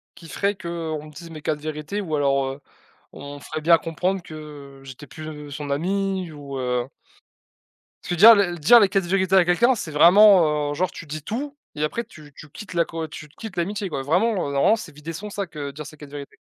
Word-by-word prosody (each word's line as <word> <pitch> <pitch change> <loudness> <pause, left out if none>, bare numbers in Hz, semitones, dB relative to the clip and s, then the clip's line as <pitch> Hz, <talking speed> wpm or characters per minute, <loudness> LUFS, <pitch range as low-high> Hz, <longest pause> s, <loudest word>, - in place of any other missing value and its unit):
qui 165 - -13
ferait 200 +5 -1
qu'on 165 -4 -5
me 155 - -12
dise 165 +3 -10
mes 155 -2 -9
4 150 0 -2
vérités 155 +6 -4
ou 160 -5 -6
alors, 140 -1 +2
heu, 135 +2 -6 0.5
on 140 0 -9
me 145 - -10
ferait 155 - -6
bien 165 +1 +6
comprendre 180 +4 -2
que 150 -4 -11
j'étais 135 +2 -11
plus 155 -1 -9
son 145 0 -6
ami 190 +4 -1
ou 140 -2 -7
heu 125 0 -1 1.1
Tu - - -3
veux - - -2
dire 225 +6 +10
les 190 -5 +1
dire 200 +11 +7
les 205 - +5
4 195 -1 0
vérités 190 +1 +1
à 190 - +7
quelqu'un, 235 +9 +3
c'est 160 -7 -6
vraiment, 165 -3 +6
heu, - - -2
genre 180 +4 0
tu 165 - -10
dis 155 +1 -6
tout 275 - -5 0.2
et 150 - -2
après 230 +10 -2
tu 155 -9 -15
tu 150 +1 -13
quittes 200 +4 -10
la 170 -1 +2
co 160 -1 -5
tu 150 -1 -9
quittes 195 +5 -10
l'amitié 195 +2 -2
quoi, 135 -3 -4
vraiment, 185 +6 +1
heu, - - -5
normalement, 140 +11 +4
c'est 165 -8 -9
vider 150 +3 -7
son 205 +6 -7
sac, 195 -6 -6
heu, 140 -1 -5
dire 150 +1 -8
ses 155 +1 -12
4 145 -1 -11
vérités. 145 -1 -9
160 Hz, 230 wpm, -23 LUFS, 145-190 Hz, 1.1 s, dire